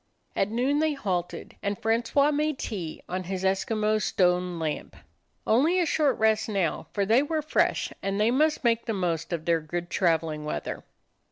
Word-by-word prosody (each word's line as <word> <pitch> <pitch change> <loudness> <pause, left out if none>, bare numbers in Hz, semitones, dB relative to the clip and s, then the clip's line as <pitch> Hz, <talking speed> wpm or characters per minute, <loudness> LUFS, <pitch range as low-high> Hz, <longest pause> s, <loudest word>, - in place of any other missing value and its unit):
At 195 - +1
noon 255 +6 +1
they 315 -1 +2
halted, 180 -10 -4
and 200 0 -2
Francois 235 +6 +2
made 300 0 0
tea 180 -11 -5
on 185 0 -3
his 190 +1 -4
Eskimo 215 +3 +1
stone 180 -2 +1
lamp. 160 -2 -4 0.5
Only 305 +11 +3
a 350 - +2
short 300 -3 +2
rest 220 0 +2
now, 195 -6 -1
for 200 -1 0
they 225 +6 +4
were 310 +1 -1
fresh, 305 - +1
and 195 +1 -2
they 215 +2 +3
must 305 +4 +2
make 235 -1 +1
the 225 - 0
most 170 -4 -2
of 165 -2 -3
their 165 -1 +2
good 175 +3 -5
traveling 160 -4 +1
weather. 150 - -4
210 Hz, 175 wpm, -27 LUFS, 175-255 Hz, 0.5 s, they